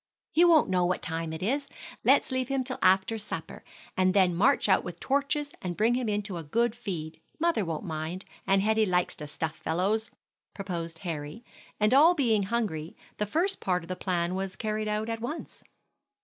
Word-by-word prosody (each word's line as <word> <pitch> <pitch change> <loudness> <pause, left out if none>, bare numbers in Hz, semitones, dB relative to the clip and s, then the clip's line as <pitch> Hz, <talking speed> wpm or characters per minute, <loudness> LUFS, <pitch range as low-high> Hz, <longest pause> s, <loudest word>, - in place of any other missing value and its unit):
"He 335 - +4
won't 335 -3 +6
know 180 -1 +3
what 180 +1 0
time 165 0 -3
it 160 +2 -5
is; 275 +7 -1 0.3
let's - - +4
leave 260 -1 0
him 270 -1 0
till 255 0 -4
after 190 +4 +3
supper, 210 - -6 0.3
and 185 0 +2
then 185 -3 +4
march 245 +10 +3
out - - +4
with 175 -1 -7
torches 285 +1 0
and 175 -2 -4
bring 225 +3 +3
him 245 -2 0
in 205 0 0
to 195 -3 -5
a 165 - -5
good 230 +9 +1
feed. 175 -10 -6 0.2
Mother 335 -9 +2
won't 165 -3 -3
mind, 160 +3 -4 0.2
and 195 0 +3
Hetty 220 0 +3
likes 180 -1 +1
to 150 - -6
stuff 155 +1 -3
fellows," 200 +7 0 0.5
proposed 170 -4 -4
Harry, 160 +7 -5 0.3
and 210 +3 +3
all 320 +6 +7
being 230 -8 +2
hungry, 190 -7 -2 0.2
the 210 - -1
first 350 - +1
part 180 -2 0
of 165 - -13
the 185 - -2
plan 175 -2 -1
was 190 0 -3
carried 215 0 -2
out 210 +1 -1
at 225 -1 -3
once. 255 +8 -6
200 Hz, 195 wpm, -28 LUFS, 175-235 Hz, 0.5 s, all